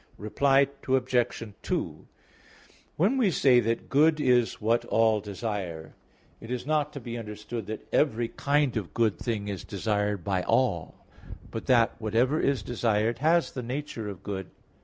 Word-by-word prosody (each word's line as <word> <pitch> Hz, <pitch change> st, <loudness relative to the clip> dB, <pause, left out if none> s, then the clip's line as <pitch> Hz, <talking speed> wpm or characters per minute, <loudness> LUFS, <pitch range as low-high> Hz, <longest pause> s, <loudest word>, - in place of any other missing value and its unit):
Reply 135 Hz, +6 st, +3 dB, 0.2 s
Obj. 130 Hz, -3 st, +1 dB, 0.2 s
2: -, -, -3 dB, 0.9 s
When 205 Hz, -, +2 dB
we 235 Hz, -7 st, +3 dB
say 135 Hz, -7 st, +4 dB
that 115 Hz, 0 st, -1 dB
good 155 Hz, +3 st, +4 dB
is 125 Hz, -4 st, +2 dB
what 115 Hz, +2 st, +1 dB
all 110 Hz, -2 st, +2 dB
desire, 100 Hz, -6 st, -5 dB, 0.5 s
it 115 Hz, -, -11 dB
is 125 Hz, 0 st, -3 dB
not 150 Hz, 0 st, 0 dB
to 140 Hz, -, -6 dB
be 120 Hz, -1 st, -6 dB
understood 105 Hz, +1 st, -6 dB
that 110 Hz, 0 st, -6 dB
every 120 Hz, -6 st, +2 dB
kind 145 Hz, -2 st, +1 dB
of 90 Hz, -8 st, -5 dB
good 115 Hz, -3 st, +1 dB
thing 110 Hz, -4 st, -3 dB
is 100 Hz, -3 st, -4 dB
desired 105 Hz, -1 st, -1 dB
by 95 Hz, -1 st, 0 dB
all; 90 Hz, -8 st, 0 dB, 0.5 s
but 115 Hz, -, -6 dB
that 120 Hz, -3 st, +4 dB
whatever 120 Hz, +8 st, +1 dB
is 135 Hz, -7 st, +1 dB
desired 115 Hz, 0 st, 0 dB
has 165 Hz, +3 st, +3 dB
the 130 Hz, -, -5 dB
nature 125 Hz, -3 st, -5 dB
of 95 Hz, -2 st, -9 dB
good. 95 Hz, -3 st, -5 dB
115 Hz, 155 wpm, -27 LUFS, 105-135 Hz, 0.9 s, say